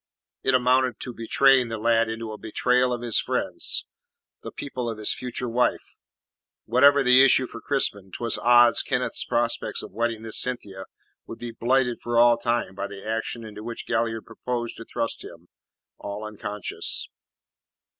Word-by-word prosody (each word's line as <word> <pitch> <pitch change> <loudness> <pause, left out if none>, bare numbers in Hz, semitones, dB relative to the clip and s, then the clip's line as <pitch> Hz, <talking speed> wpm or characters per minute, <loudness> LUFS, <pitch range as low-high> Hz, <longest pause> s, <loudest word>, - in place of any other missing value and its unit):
It 130 - +2
amounted 125 -1 +2
to 125 - -5
betraying 130 +2 +3
the 115 -1 -4
lad 115 +1 +2
into 110 0 -5
a 105 - -7
betrayal 125 +3 +1
of 120 -1 -3
his 120 -2 +2
friends - - 0 0.6
the - - -8
people 125 -4 -5
of 115 - -5
his 110 - -1
future 125 0 -5
wife. 120 +1 0 0.7
Whatever 140 +4 +5
the 125 +1 +7
issue 130 -1 +5
for 115 - -10
Crispin, 100 -9 -1
'twas 115 +2 -1
odds 120 0 +5
Kenneth's - - -2
prospect 120 0 -1
of - - -9
wedding 115 +1 -2
this 110 -1 -2
Cynthia 100 -7 -5 0.4
would 115 - -8
be 120 -1 -6
blighted 125 +1 0
for 120 0 -2
all 120 0 +5
time 120 -5 -1
by 100 +1 -4
the 100 +1 -10
action 115 +1 -3
into 105 -1 -9
which 115 +1 -6
Galliard 115 -1 -1
proposed 120 +1 -4
to 115 - -9
thrust 115 - -3
him 85 +1 -13 0.5
all 100 +1 -6
unconscious. 105 -1 -3
115 Hz, 165 wpm, -25 LUFS, 110-125 Hz, 0.7 s, the